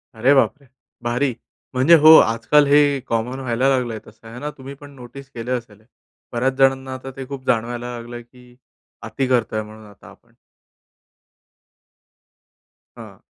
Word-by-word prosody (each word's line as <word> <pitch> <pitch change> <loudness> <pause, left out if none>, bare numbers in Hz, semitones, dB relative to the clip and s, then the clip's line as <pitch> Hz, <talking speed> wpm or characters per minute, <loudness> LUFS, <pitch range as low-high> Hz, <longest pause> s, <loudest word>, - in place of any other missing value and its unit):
अरे 125 +5 +3
बापरे! 140 +1 +1 0.4
भारी, 125 +3 -1 0.4
म्हणजे 130 +7 +5
हो 160 0 +11
आजकाल 115 +7 +3
हे 145 -1 +4
कॉमन 115 +3 -2
व्हायला 130 0 0
लागलंय 125 -4 -1
तसं, 110 +1 -17
आहे 115 +2 -10
ना 145 +2 -4
तुम्हीपण 140 +2 -11
नोटीस 135 +2 -12
केले 120 +1 -5
असेल? 115 -4 -5 0.5
बऱ्याच 130 +3 0
जणांना 135 -1 +2
आता 130 +1 -8
ते 135 - -6
खूप 135 -1 -8
जाणवायला 120 +1 -2
लागलंय 120 +1 -9
की 125 0 -20 0.5
अति 135 - -3
करतोय 115 -4 0
म्हणून 110 0 -12
आता 100 -3 -17
आपण. - - -21 2.6
हां. - - -13
125 Hz, 140 wpm, -20 LUFS, 115-135 Hz, 2.6 s, हो